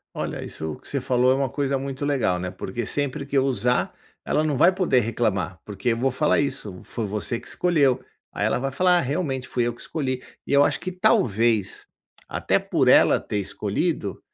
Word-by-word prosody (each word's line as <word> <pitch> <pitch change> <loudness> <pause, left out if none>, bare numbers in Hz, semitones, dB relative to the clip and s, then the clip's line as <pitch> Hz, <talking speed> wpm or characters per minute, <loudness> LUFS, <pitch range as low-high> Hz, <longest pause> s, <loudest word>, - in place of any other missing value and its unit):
Olha, - - -4
isso 80 -1 -5
que - - -12
você 140 - -1
falou 125 0 +2
é - - +5
uma 135 -1 0
coisa 140 0 -1
muito 135 +1 -4
legal, 130 -11 +1
né, 90 0 -3
porque 95 +5 -5
sempre 145 +4 -2
que 140 0 0
eu 135 - +3
usar, 125 -2 0 0.3
ela 150 - +1
não 155 -3 0
vai 175 +8 +5
poder 185 -8 +2
reclamar, 100 -6 -1
porque 105 +4 -2
eu 115 - +1
vou 130 +3 +1
falar 145 +4 +2
isso: 105 -9 -4
"Foi 115 -3 -4
você 105 +4 -2
que - - -14
escolheu". 150 -8 +2 0.3
Aí - - -2
ela - - +1
vai 135 +1 -3
falar: 180 +4 +3
"Realmente 135 -2 -2
fui 125 - -1
eu - - -2
que 120 - -17
escolhi", 130 -5 -3 0.2
e - - -5
eu 140 0 +6
acho - - 0
que 185 - -4
talvez, 115 - +1 0.4
até - - +1
por - - +1
ela - - +6
ter 105 - -3
escolhido, 100 - -2
130 Hz, 205 wpm, -24 LUFS, 110-140 Hz, 0.4 s, eu